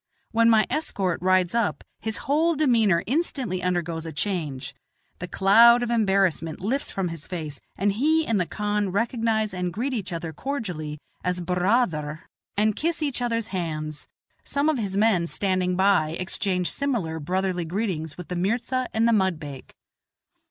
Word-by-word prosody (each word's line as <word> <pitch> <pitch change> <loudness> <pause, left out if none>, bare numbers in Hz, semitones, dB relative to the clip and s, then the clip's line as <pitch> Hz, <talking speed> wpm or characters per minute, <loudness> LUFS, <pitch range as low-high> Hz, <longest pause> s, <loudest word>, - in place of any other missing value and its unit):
When 230 0 +4
my 220 -2 +5
escort 195 - -1
rides 185 0 +3
up 230 -2 0 0.2
his 220 0 -4
whole 320 +4 +2
demeanor 230 - +3
instantly 255 - -1
undergoes 175 -2 -1
a 165 - -5
change; 150 -6 -3 0.5
the 180 - -5
cloud 230 +7 +6
of 240 - -2
embarrassment 195 -7 +1
lifts 245 +9 -1
from 190 -3 -2
his 165 -3 -8
face, 155 -5 -5 0.2
he 275 - +2
and 215 -5 +1
the 175 - -1
khan 205 -2 -1
recognize 225 0 0
and 180 -1 -2
greet 245 +9 -2
each 205 -7 -3
other 165 -1 -4
cordially 175 - -4 0.3
as 180 0 -1
"bur 180 +1 -2
raa 230 +7 +4
ther," 155 -2 -6 0.3
and 215 0 +2
kiss 325 +3 -1
each 280 -4 -2
other's 230 -2 -1
hands; 155 -5 -4 0.4
some 285 +2 +1
of 300 -5 +1
his 200 -3 -2
men 200 -5 +3
standing 185 -1 0
by 180 -4 +3
exchange 185 0 -1
similar 220 - -1
brotherly 180 +3 -1
greetings 165 -3 -3
with 180 - -8
the 180 - -3
mirza 235 +7 0
and 225 +1 +3
the 235 - +4
mudbake. 160 -9 -2
195 Hz, 160 wpm, -25 LUFS, 175-230 Hz, 0.5 s, cloud